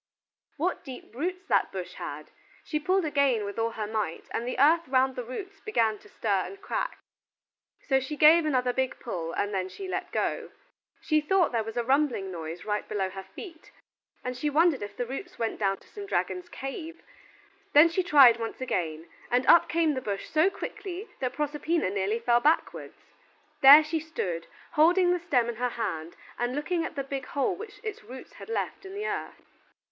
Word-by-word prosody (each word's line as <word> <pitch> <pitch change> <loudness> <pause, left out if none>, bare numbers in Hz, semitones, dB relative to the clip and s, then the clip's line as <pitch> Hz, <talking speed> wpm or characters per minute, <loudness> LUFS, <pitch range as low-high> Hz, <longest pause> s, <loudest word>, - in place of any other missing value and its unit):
What 350 +5 -1
deep 260 -4 -10
roots 365 +8 -3
that - - +2
bush - - -6
had! - - -7 0.3
She 305 - -2
pulled 370 +4 +1
again 280 -7 +2
with 200 +2 -5
all 225 0 +1
her 220 -2 -4
might, 210 -6 -3
and 235 - -3
the 250 - -3
earth 320 +5 +4
round 260 0 +2
the 250 - -4
roots 380 - -7
began 225 - 0
to - - -18
stir 200 -3 0
and 395 - -9
crack, - - -3 0.9
so 265 -2 +4
she 295 +3 -5
gave 320 +3 +7
another 255 -5 +1
big 260 0 -1
pull, 170 -9 -4
and 205 0 -1
then 190 -1 -1
she 385 - -8
let - - -4
go. - - -1 0.5
She 310 -1 +2
thought 360 +2 +2
there 230 -2 0
was 225 +2 -7
a 240 - +1
rumbling 260 -7 +1
noise 165 0 -6
right 210 -1 -2
below 190 -2 -1
her 195 0 -7
feet, 330 -6 -10 0.5
and 250 0 -3
she 295 +4 -1
wondered 310 -1 +3
if 205 0 -7
the 245 - -1
roots 315 - -7
went 225 -1 -2
down 195 -2 +1
to - - -22
some 405 -1 -9
dragon's 360 -3 -2
cave. 320 +3 -7 0.7
Then 295 +3 +9
she 335 +3 0
tried 275 -9 +7
once 225 0 -5
again, 165 -10 -3 0.2
and 250 +1 +2
up 340 - +6
came 325 -2 +2
the 260 - -3
bush 200 -4 -4
so 315 +5 +3
quickly 390 +1 -7
that 255 -1 -2
Proserpina 295 - -1
nearly 200 +2 0
fell 235 +1 +3
backwards. 305 +6 0 0.6
There 285 +3 +10
she 310 +1 -2
stood, 185 - -4 0.2
holding 355 +4 +4
the 360 - +1
stem 275 -9 +1
in 235 -2 -4
her 250 +1 0
hand 170 -9 -4 0.2
and 240 +2 -1
looking 330 +3 -1
at - - -5
the 275 - -2
big 270 -1 -5
hole 285 +7 0
which 415 +2 -10
its 435 - -5
roots 255 +5 -11
had - - -11
left 455 - -3
in 385 0 -9
the 420 +1 -3
earth. - - -4
270 Hz, 195 wpm, -28 LUFS, 225-330 Hz, 0.9 s, There